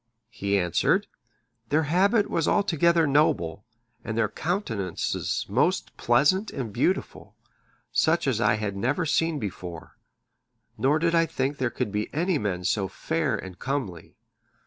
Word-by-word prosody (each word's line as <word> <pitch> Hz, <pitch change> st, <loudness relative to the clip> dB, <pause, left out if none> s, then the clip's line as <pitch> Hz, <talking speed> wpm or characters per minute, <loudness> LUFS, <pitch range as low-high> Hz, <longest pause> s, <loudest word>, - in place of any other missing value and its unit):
He 100 Hz, -1 st, 0 dB
answered, 90 Hz, -4 st, +2 dB, 0.6 s
"Their 155 Hz, +2 st, +2 dB
habit 200 Hz, +7 st, +3 dB
was 165 Hz, -, 0 dB
altogether 170 Hz, -4 st, +3 dB
noble, 110 Hz, -, +1 dB, 0.4 s
and 110 Hz, 0 st, -4 dB
their 110 Hz, -3 st, +2 dB
countenances 115 Hz, -, -2 dB
most -, -, 0 dB
pleasant 150 Hz, -, +2 dB
and 120 Hz, -7 st, -5 dB
beautiful, -, -, -1 dB, 0.6 s
such 170 Hz, +2 st, +2 dB
as 125 Hz, -5 st, 0 dB
I 110 Hz, 0 st, +3 dB
had 105 Hz, -2 st, -3 dB
never 130 Hz, -, 0 dB
seen 165 Hz, +1 st, +1 dB
before, 90 Hz, -, -7 dB, 0.8 s
nor 140 Hz, +4 st, +2 dB
did 165 Hz, +1 st, +1 dB
I 165 Hz, -1 st, +3 dB
think 135 Hz, 0 st, -2 dB
there 130 Hz, -3 st, 0 dB
could 105 Hz, -, -3 dB
be 105 Hz, +1 st, -2 dB
any 175 Hz, +1 st, +1 dB
men 95 Hz, -4 st, -2 dB
so 100 Hz, 0 st, 0 dB
fair 160 Hz, -, -1 dB
and 95 Hz, -2 st, -9 dB
comely. 130 Hz, -, -4 dB
135 Hz, 140 wpm, -26 LUFS, 100-165 Hz, 0.8 s, habit